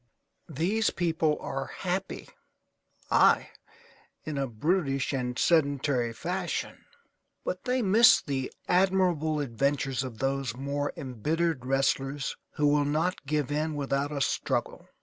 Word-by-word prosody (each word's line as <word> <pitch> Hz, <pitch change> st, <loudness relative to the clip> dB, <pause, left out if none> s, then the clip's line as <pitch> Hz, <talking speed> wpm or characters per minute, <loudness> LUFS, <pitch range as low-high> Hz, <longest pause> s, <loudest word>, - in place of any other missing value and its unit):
These 185 Hz, +9 st, +1 dB
people 160 Hz, -3 st, 0 dB
are 135 Hz, -1 st, -4 dB
happy, 190 Hz, +5 st, -4 dB, 0.8 s
aye, -, -, +4 dB, 0.7 s
in 155 Hz, -, -4 dB
a 135 Hz, -1 st, -1 dB
brutish 135 Hz, -, 0 dB
and 125 Hz, -2 st, -2 dB
sedentary 140 Hz, -6 st, +2 dB
fashion, 180 Hz, +10 st, -4 dB, 0.6 s
but -, -, -4 dB
they 250 Hz, -1 st, +1 dB
miss 215 Hz, +4 st, +7 dB
the 135 Hz, -3 st, -3 dB, 0.2 s
admirable 180 Hz, -4 st, +2 dB
adventures 135 Hz, 0 st, 0 dB
of 125 Hz, -4 st, -7 dB
those 135 Hz, -1 st, -1 dB
more 140 Hz, +2 st, -2 dB
embittered 145 Hz, +3 st, -2 dB
wrestlers 135 Hz, +1 st, 0 dB, 0.2 s
who 150 Hz, -, 0 dB
will 145 Hz, 0 st, +4 dB
not 155 Hz, +2 st, -1 dB
give 150 Hz, -2 st, 0 dB
in 155 Hz, +1 st, -1 dB
without 140 Hz, 0 st, -1 dB
a 145 Hz, -2 st, -3 dB
struggle. -, -, -1 dB
145 Hz, 120 wpm, -28 LUFS, 135-170 Hz, 0.8 s, miss